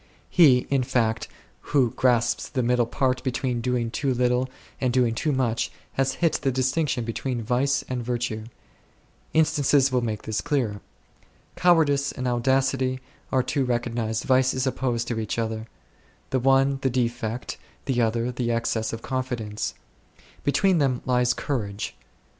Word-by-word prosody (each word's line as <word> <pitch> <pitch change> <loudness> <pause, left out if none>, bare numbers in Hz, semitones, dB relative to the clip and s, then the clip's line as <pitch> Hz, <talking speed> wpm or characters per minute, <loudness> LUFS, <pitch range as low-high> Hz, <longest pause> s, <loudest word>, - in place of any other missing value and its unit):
He, 135 -8 +6
in 135 -1 +3
fact, 115 -3 0 0.5
who 125 -5 +4
grasps 120 -1 +1
the 130 -3 -1
middle 120 -1 +2
point 130 +1 0
between 125 -2 -1
doing 120 -1 -1
too 135 0 0
little 125 +1 +1 0.3
and 130 -2 +1
doing 120 -2 +2
too 150 +7 0
much 125 -4 0 0.2
has 135 0 +1
hit 165 -2 +1
the 135 -2 +1
distinction 130 0 0
between 120 +1 -3
vice 135 +4 +1
and 125 -2 -3
virtue. 115 -2 -2 0.9
Instances 145 -3 +3
will 125 -1 +2
make 110 -3 -3
this 110 -1 -2
clearer. 115 -9 -1 0.7
Cowardice 155 -6 +3
and 130 - -4
audacity 130 +1 +1 0.3
are 130 -1 +3
two 140 +2 0
recognized 120 -2 -1
vices 130 0 +2
opposed 120 -3 -1
to 115 -2 -2
each 110 0 -3
other; 110 -1 -2 0.6
the 130 - +2
one 135 +1 +3
the 135 - +2
defect, 120 -1 -2 0.3
the 125 -3 +1
other 115 +2 0
the 120 -1 -2
excess 115 -1 -1
of 115 - -6
confidence; 125 -5 -3 0.7
between 180 +5 +3
them 130 -4 +1
lies 125 -1 +2
courage. 105 -7 -3
125 Hz, 145 wpm, -25 LUFS, 115-135 Hz, 0.9 s, He